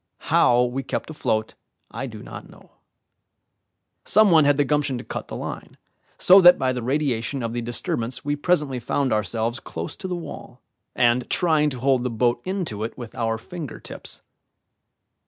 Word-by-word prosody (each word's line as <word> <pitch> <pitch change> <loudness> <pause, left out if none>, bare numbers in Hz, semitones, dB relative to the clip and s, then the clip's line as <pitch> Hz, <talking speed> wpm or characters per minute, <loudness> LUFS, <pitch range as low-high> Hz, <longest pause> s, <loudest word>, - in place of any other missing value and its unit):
How 120 0 +5
we 125 +2 -2
kept 135 - -4
afloat, 110 -7 -1 0.4
I - - -5
do - - -9
not - - -10
know. - - -18 1.3
Some 215 -1 +4
one 160 -3 +6
had 145 -1 +4
the 145 - +3
gumption 145 -1 0
to - - -7
cut - - -6
the - - -7
line, - - -7 0.4
so 190 +2 +7
that 175 0 +8
by 130 -1 0
the 125 - -3
radiation 130 -1 -1
of 115 0 -3
the 120 - -2
disturbance 120 +1 -3
we 145 0 0
presently 145 -4 0
found 130 +1 0
ourselves 110 +3 -1
close 80 +1 -6
to 190 - -6
the 180 - -2
wall, 145 -7 -9 0.4
and 120 +1 +2
trying 155 -3 +2
to 130 -3 -6
hold 130 -1 +2
the 125 - -1
boat 120 +1 +1
in 185 0 -2
to 105 -6 -5
it 115 - -5
with 120 -3 -8
our 115 -1 -1
finger 155 +3 -8
tips. - - -7
130 Hz, 180 wpm, -23 LUFS, 120-150 Hz, 1.3 s, that